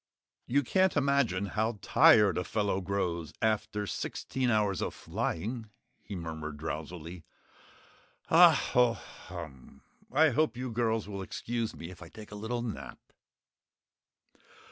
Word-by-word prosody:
"You 140 +3 +2
can't 185 +6 +2
imagine 140 -9 +2
how 110 +3 -1
tired 100 -5 +6
a - - -1
fellow 100 -2 -1
grows 90 -4 -2
after 105 -2 0
sixteen 125 - -2
hours 105 -4 +1
of - - -3
flying," 110 +6 -3 0.3
he 100 - -7
murmured 80 -3 -5
drowsily. 80 +3 -6 1.0
"Hah, - - +8 0.2
hoh, 125 -1 +5
HUM! 65 0 -11 0.3
I 155 +4 +5
hope 130 -2 +1
you 125 -1 -4
girls 115 -2 0
will 100 -2 -5
excuse 115 +3 -3
me 85 +2 -8
if 90 - -13
I 85 - -10
take 105 +3 -12
a - - -7
little 115 +3 -3
nap?" 70 - -6
105 Hz, 130 wpm, -30 LUFS, 85-120 Hz, 1.0 s, Hah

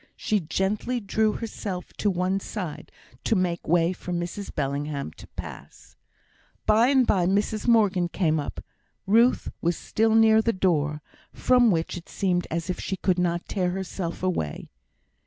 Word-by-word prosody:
She 215 - 0
gently 200 +8 -1
drew 215 0 +1
herself 200 -5 -5
on 205 -2 +3
one 185 +2 0
side 185 -6 -6 0.3
to 225 - +2
make 180 -3 -1
way 170 +1 +3
for 180 - -8
Mrs 175 +3 -4
Bellingham 140 - -2
to - - -14
pass. - - -10 0.7
By 225 +3 +5
and 265 -2 +4
by 180 -6 +2
Mrs 205 +3 0
Morgan 205 -6 +4
came 160 -3 0
up. 145 - -5 0.4
Ruth 230 +5 +3
was 170 0 0
still 220 0 +1
near 220 0 +6
the 230 +1 +1
door, 150 -5 0 0.3
from 250 -2 +4
which 165 -2 0
it 170 - -11
seemed 180 -3 0
as 165 0 -3
if 180 - -3
she 190 - -3
could 185 -1 +1
not 175 -1 0
tear 180 -3 0
herself 180 -2 -4
away. 170 - -2
185 Hz, 155 wpm, -25 LUFS, 170-215 Hz, 0.7 s, near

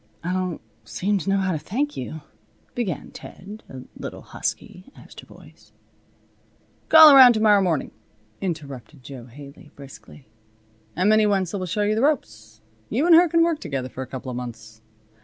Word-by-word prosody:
"I 180 +2 -3
don't 185 -2 -3 0.2
seem 195 - -2
to 190 - -5
know 195 - +2
how 190 -1 -1
to 160 - -3
thank 265 - -3
you," 150 +5 -7 0.5
began 210 -10 -4
Ted, 210 +4 -12
a 130 -1 -10
little - - -9
husky 185 +9 -6
as - - -16
to - - -13
voice. - - -19 1.2
"Call 315 -2 +9
around 255 -2 +9
to 220 - -2
morrow 210 -2 +4
morning," 170 -7 -1 0.5
interrupted 145 - -7
Jo 130 -3 -10
Haley, 140 +4 -14
briskly, 140 0 -14 0.7
"and 185 +3 0
Minnie 215 0 +4
Wenzel 195 -1 -1
will 185 - -5
show 205 +4 -2
you 210 +1 +1
the 220 - -1
ropes. 110 - -2 0.3
You 260 +8 0
and 345 - +5
her 340 +1 +6
can 335 +1 +3
work 335 -2 0
together 135 -6 -5
for 130 - -8
a 130 - -6
couple 130 0 -7
of 120 - -6
months. 110 -3 -9
180 Hz, 175 wpm, -22 LUFS, 130-215 Hz, 1.2 s, Call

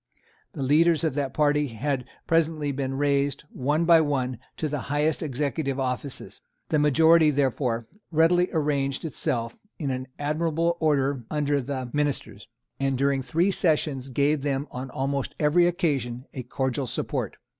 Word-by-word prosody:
The 135 - -4
leaders 160 +4 +4
of 160 -4 +1
that 140 -1 -1
party 150 -1 +2
had 130 +2 -2 0.2
presently 160 -3 +1
been 135 -1 -3
raised, 140 0 +1
one 150 +5 0
by 165 -1 +7
one, 130 -5 -1 0.2
to 155 - -1
the 150 -1 -2
highest 150 +2 +1
executive 140 -1 -2
offices. 130 +1 -4 0.3
The 155 - +2
majority, 160 +2 +5
therefore, 130 -4 0 0.2
readily 175 +3 +3
arranged 145 -3 0
itself 125 -6 -2 0.2
in 130 -4 -3
admirable 165 +3 0
order 140 -4 +1
under 145 -2 0
the 130 -1 -4
ministers, 140 -9 -2 0.3
and 135 -1 0
during 140 0 +1
three 165 +9 +1
sessions 150 -7 0
gave 140 +3 +1
them 140 0 -1
on 130 +1 -6
almost 135 +1 -2
every 160 +4 +4
occasion 140 -9 -1
a 130 - -4
cordial 130 +1 -2
support. - - -3
145 Hz, 145 wpm, -26 LUFS, 135-155 Hz, 0.3 s, by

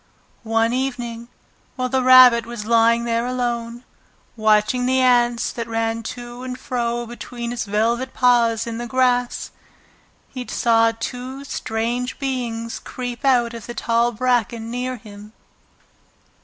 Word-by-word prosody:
One 225 +1 +2
evening, 245 -3 -3 0.5
while 255 -1 -1
the 260 +1 0
Rabbit 255 -2 +7
was 235 -3 -6
lying 230 +1 +3
there 235 +1 0
alone, 240 -1 -3 0.5
watching 215 +3 +2
the 260 0 +2
ants 240 -2 +3
that 235 -1 -5
ran 225 0 -1 0.2
to 240 0 -9
and 255 0 -5
fro 240 -2 -2
between 240 0 -7
his 240 -2 -3
velvet 230 +5 0
paws 235 -3 +3
in 230 0 -5
the 240 - -4
grass, 245 0 0 0.8
he 250 -2 -7
saw 230 -1 +3
two 255 +2 -5
strange 240 -1 -3
beings 240 -4 -3
creep 245 0 -6
out 245 -3 +3
of 230 -2 -9
the 240 - -7
tall 235 +1 +1
bracken 235 -1 -1
near 250 +1 -3
him. 210 0 -13
240 Hz, 135 wpm, -21 LUFS, 230-250 Hz, 0.8 s, Rabbit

